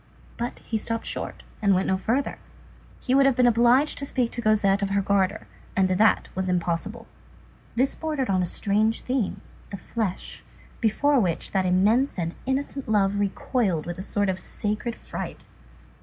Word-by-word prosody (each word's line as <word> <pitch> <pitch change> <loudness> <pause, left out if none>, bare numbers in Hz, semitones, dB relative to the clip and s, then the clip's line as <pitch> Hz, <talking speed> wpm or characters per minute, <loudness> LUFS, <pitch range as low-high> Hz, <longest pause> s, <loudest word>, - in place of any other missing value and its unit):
But 240 +1 -4
he 220 - -1
stopped 230 +1 -3
short, - - -5 0.2
and 200 -2 +4
went 185 - +1
no 190 - +2
further. 230 +8 -1 0.6
He 255 - -1
would 275 0 +6
have 270 - +3
been 250 - +4
obliged 240 +5 +4
to 280 - -2
speak 250 -4 0
to 240 - -2
Cosette 210 -3 +3
of 200 - 0
her 200 0 +1
garter, 200 +1 +1 0.3
and 190 -1 +3
that 210 +4 +3
was 185 0 -2
impossible. 180 +6 -2 0.7
This 260 +3 +2
bordered 305 -5 -2
on 185 -2 +2
a 180 - 0
strange 215 +5 +1
theme, 250 -5 -2 0.3
the 200 - -6
flesh, 200 0 -4 0.4
before 270 +5 +3
which 180 -7 -1
that 190 -2 +1
immense 210 +10 +3
and 170 -1 -2
innocent 270 -1 -2
love 205 -2 +2
recoiled 205 - 0
with 175 +1 -5
a - - -3
sort 205 +1 0
of 190 -1 -1
sacred 215 +3 -3
fright. - - -7
215 Hz, 170 wpm, -25 LUFS, 190-245 Hz, 0.7 s, would